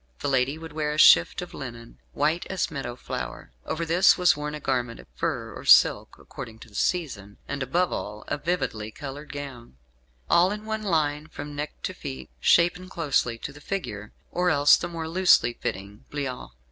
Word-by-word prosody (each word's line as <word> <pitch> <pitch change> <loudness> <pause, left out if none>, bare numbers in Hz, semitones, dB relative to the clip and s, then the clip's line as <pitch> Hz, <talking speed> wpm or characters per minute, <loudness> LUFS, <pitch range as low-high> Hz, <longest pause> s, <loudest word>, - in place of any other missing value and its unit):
The - - -1
lady 135 +2 +1
would 160 -1 -9
wear 150 -1 -1
a - - -5
shift 85 - +6
of 180 - -11
linen, 120 -3 -9
"white 155 +4 0
as 190 -3 -2
meadow 135 -5 -5
flower." 65 - -6 0.2
Over 170 +1 -2
this 175 +3 +5
was 180 -1 +4
worn 150 0 -4
a - - -6
garment 125 -4 -2
of - - -12
fur - - -3
or - - -9
silk, - - +5
according 110 -1 -9
to - - -11
the - - -22
season; 105 - -2
and, 145 -1 -4
above 170 +8 +1
all, 105 +1 -5
a 145 - -2
vividly 130 -12 -2
coloured 145 +4 -8
gown, 135 - -8 0.5
all 180 +3 +4
in 210 +1 -5
one 220 0 -3
line 155 -6 0
from 145 -2 -8
neck 150 +1 -6
to - - -2
feet, 65 -1 -8
shapen 175 - +3
closely 140 -9 0
to 140 - -7
the 145 - -14
figure, 105 - -5 0.2
or 180 0 +1
else 145 -2 +6
the - - -3
more 165 -2 -5
loosely 175 -7 +4
fitting 100 0 -6
bliaut. 135 - -4
145 Hz, 190 wpm, -26 LUFS, 120-170 Hz, 0.5 s, shift